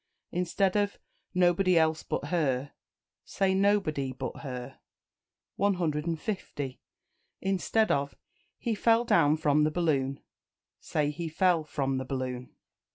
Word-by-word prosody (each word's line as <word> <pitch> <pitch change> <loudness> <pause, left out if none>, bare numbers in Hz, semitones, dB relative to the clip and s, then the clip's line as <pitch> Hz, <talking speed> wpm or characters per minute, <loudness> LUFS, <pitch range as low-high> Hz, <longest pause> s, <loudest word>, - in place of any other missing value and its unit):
Instead 180 +2 +1
of 205 -1 +1 0.4
"Nobody 180 0 +4
else 160 -1 +3
but - - -3
her," 140 -6 0 0.5
say 190 -1 0
"Nobody 190 -9 +2
but 130 - -5
her." 125 0 -7 0.8
150. 165 - -2 0.6
Instead 195 +3 +1
of 140 0 0 0.4
"He 235 - -1
fell 230 +2 +3
down 155 -8 +4
from 150 -1 +3
the 155 - +3
balloon," 140 -5 0 0.6
say 150 -1 -1
"He 165 +2 -4
fell 175 0 +2
from 135 -3 -1
the 130 - -4
balloon." 130 -1 -4
160 Hz, 115 wpm, -29 LUFS, 140-190 Hz, 0.8 s, Nobody